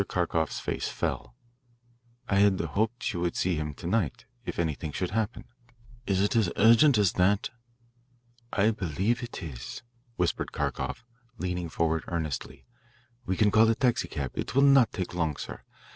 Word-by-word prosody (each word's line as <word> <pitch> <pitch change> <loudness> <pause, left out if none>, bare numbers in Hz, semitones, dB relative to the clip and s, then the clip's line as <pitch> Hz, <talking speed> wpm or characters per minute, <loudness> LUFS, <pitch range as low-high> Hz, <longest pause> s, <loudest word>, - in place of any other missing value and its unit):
Kharkoff's 85 -3 0
face - - -3
fell. - - -3 0.9
"I 100 - +1
had 100 -1 +4
hoped 110 +4 -1
you 85 - -3
would 85 -1 -1
see 90 - +1
him 75 -2 -3
to 85 - -11
night. 90 - -1 0.2
If - - -4
anything 80 -2 -2
should 90 +4 -3
happen 110 +2 -2 0.3
" 115 0 -25
"Is 95 -1 +2
it 100 - +1
as 110 -6 +3
urgent 115 +5 +6
as 100 -5 +3
that?" 100 +4 +2 1.0
"I 105 +2 +3
believe 100 - -1
it 120 -5 -6
is," 65 - -7 0.3
whispered 90 -1 -1
Kharkoff, - - -3 0.3
leaning 90 -2 -3
forward 80 0 0
earnestly. 80 -5 -4 0.6
"We 95 - 0
can 105 -1 +4
call 110 +1 +5
a 115 - +3
taxicab 110 - 0
it - - -4
will 135 - +5
not 135 -4 +6
take 90 -2 -4
long, 80 -4 0
sir. - - -7
95 Hz, 160 wpm, -28 LUFS, 85-115 Hz, 1.0 s, urgent